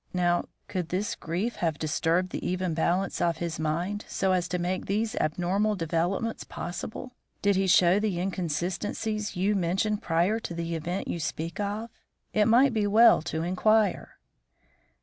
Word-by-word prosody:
Now, 175 -1 +2 0.2
could 180 -4 -3
this 200 +5 -1
grief 185 +8 -3
have 165 -4 0
disturbed 165 +4 0
the - - -4
even 185 -1 -1
balance 175 +4 0
of 170 -1 +1
his 170 -1 -4
mind 175 +7 -1
so 190 -1 0
as 180 -2 +1
to 180 +1 -2
make 180 +1 -2
these 215 +2 0
abnormal 185 +7 +1
developments 175 +6 -1
possible? 215 +8 -6 0.3
Did 200 0 +3
he 190 0 +1
show 180 +1 +5
the 205 -5 -1
inconsistencies 190 +4 -2
you 190 +4 +1
mention 195 +3 0
prior 175 +4 +1
to 175 - -6
the 170 0 -3
event 175 +4 -3
you 170 - -3
speak 165 +2 -4
of? 210 +3 -3 0.4
It 210 -1 +4
might 245 +3 +5
be 210 -2 +1
well 225 0 +6
to 160 0 -3
inquire." 205 +3 +1
185 Hz, 160 wpm, -27 LUFS, 170-210 Hz, 0.4 s, well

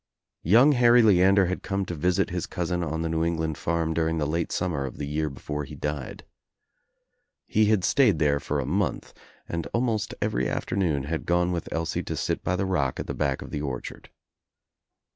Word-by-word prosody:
Young 120 - +6
Harry 120 -2 +5
Leander 95 -1 +5
had 95 +1 -3
come 100 0 -2
to 85 - -5
visit 85 +3 0
his 90 -1 -3
cousin 90 0 -2
on 80 +1 -2
the - - -1
New 80 0 0
England 80 -2 -1
farm 85 -1 0
during 80 0 0
the 75 - 0
late 80 +3 -1
summer 85 -6 -1
of 65 - -7
the 75 - -4
year 75 +1 -1
before 75 +2 -5
he 75 +2 -9
died. 75 -2 -5 1.2
He 110 0 +2
had 105 -3 +2
stayed 110 - +4
there 70 -1 +2
for 70 +1 -2
a 70 - -2
month 95 +7 -2 0.3
and 85 -1 -3
almost 115 -3 -1
every 60 +1 0
afternoon 80 -8 -1
had 80 +3 -4
gone 90 +1 +2
with 85 -2 -4
Elsie 80 0 -2
to - - -5
sit - - -2
by 90 - 0
the 95 +1 -1
roclc 70 -9 0
at - - -3
the - - -4
back, 70 -3 -1
of - - -11
the 75 - -3
orchard. 65 -4 -6
85 Hz, 200 wpm, -26 LUFS, 75-95 Hz, 1.2 s, Young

